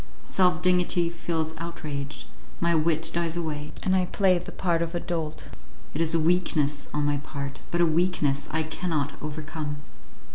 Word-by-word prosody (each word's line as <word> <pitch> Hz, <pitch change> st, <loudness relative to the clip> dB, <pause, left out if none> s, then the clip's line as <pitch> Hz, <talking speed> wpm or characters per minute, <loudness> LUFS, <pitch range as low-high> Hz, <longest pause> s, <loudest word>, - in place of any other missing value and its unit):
Self 180 Hz, -3 st, +2 dB
dignity 180 Hz, -1 st, +3 dB
feels 165 Hz, -2 st, -2 dB
outraged, 150 Hz, -4 st, -5 dB, 0.3 s
my 170 Hz, 0 st, +3 dB
wit 160 Hz, 0 st, +3 dB
dies 170 Hz, 0 st, 0 dB
away, 150 Hz, -3 st, -3 dB
and 190 Hz, -, +3 dB
I 185 Hz, -1 st, +2 dB
play 190 Hz, -1 st, +3 dB
the 175 Hz, -, -8 dB
part 170 Hz, -3 st, 0 dB
of 170 Hz, +1 st, -2 dB
a -, -, +1 dB
dolt. 160 Hz, -3 st, -4 dB, 0.4 s
It 155 Hz, -, -1 dB
is 165 Hz, 0 st, +3 dB
a -, -, +4 dB
weakness 155 Hz, -4 st, +2 dB
on 150 Hz, 0 st, 0 dB
my 145 Hz, 0 st, +2 dB
part, 140 Hz, -1 st, -5 dB
but 175 Hz, -, +1 dB
a -, -, +6 dB
weakness 160 Hz, -4 st, +1 dB
I 160 Hz, +1 st, +1 dB
cannot 155 Hz, -3 st, -2 dB
overcome. 155 Hz, 0 st, -4 dB
160 Hz, 170 wpm, -27 LUFS, 150-175 Hz, 0.4 s, a